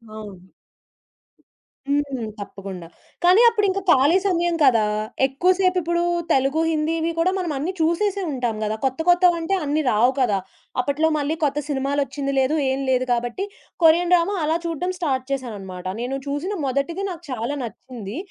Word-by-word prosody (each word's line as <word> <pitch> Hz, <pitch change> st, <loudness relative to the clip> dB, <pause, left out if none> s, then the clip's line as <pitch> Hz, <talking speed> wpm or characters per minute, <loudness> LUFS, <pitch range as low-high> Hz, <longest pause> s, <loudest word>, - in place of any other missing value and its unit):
అవును. 195 Hz, -4 st, -10 dB, 1.4 s
హ్మ్. 280 Hz, -5 st, -1 dB
తప్పకుండా 195 Hz, -3 st, -8 dB, 0.4 s
కానీ 365 Hz, +5 st, +6 dB
అప్పుడింకా 400 Hz, -3 st, 0 dB
ఖాళీ 280 Hz, +5 st, +5 dB
సమయం 345 Hz, -2 st, +1 dB
కదా! 230 Hz, -6 st, +5 dB, 0.4 s
ఎక్కువ 275 Hz, +7 st, 0 dB
సేపిప్పుడు 355 Hz, -2 st, +1 dB, 0.3 s
తెలుగు, 270 Hz, +4 st, +2 dB
హిందీవి 320 Hz, +1 st, 0 dB
కూడా 360 Hz, +3 st, +3 dB
మనం 350 Hz, -3 st, -2 dB
అన్నీ 305 Hz, +7 st, -2 dB
చూసేసే 390 Hz, +5 st, +1 dB
ఉంటాం 245 Hz, -4 st, -2 dB
గదా! 215 Hz, 0 st, -1 dB
కొత్త 265 Hz, +2 st, -1 dB
కొత్తవంటే 350 Hz, +1 st, +3 dB
అన్నీ 295 Hz, +2 st, +1 dB
రావు 240 Hz, +4 st, +4 dB
కదా! 210 Hz, -6 st, +2 dB, 0.4 s
అప్పట్లో 285 Hz, +5 st, +1 dB
మళ్ళీ 295 Hz, +2 st, -1 dB
కొత్త 285 Hz, 0 st, +1 dB
సినిమాలొచ్చింది 275 Hz, 0 st, -1 dB
లేదు 265 Hz, +4 st, +2 dB
ఏం 265 Hz, +1 st, -1 dB
లేదు. 255 Hz, 0 st, +2 dB
కాబట్టి 240 Hz, +10 st, -2 dB, 0.4 s
కొరియన్ 340 Hz, +2 st, +5 dB
డ్రామా 355 Hz, +3 st, +3 dB
అలా 315 Hz, +2 st, +1 dB
చూడడం 335 Hz, +3 st, -2 dB
స్టార్ట్ 265 Hz, -6 st, -1 dB
చేశానన్నమాట. 200 Hz, -9 st, -5 dB, 0.2 s
నేను 255 Hz, +3 st, -2 dB
చూసిన 290 Hz, +8 st, -2 dB
మొదటిది 280 Hz, +8 st, -1 dB
నాకు 350 Hz, -2 st, -7 dB
చాలా 245 Hz, +4 st, -2 dB
నచ్చింది. 235 Hz, -1 st, -8 dB
285 Hz, 140 wpm, -22 LUFS, 250-340 Hz, 1.4 s, కానీ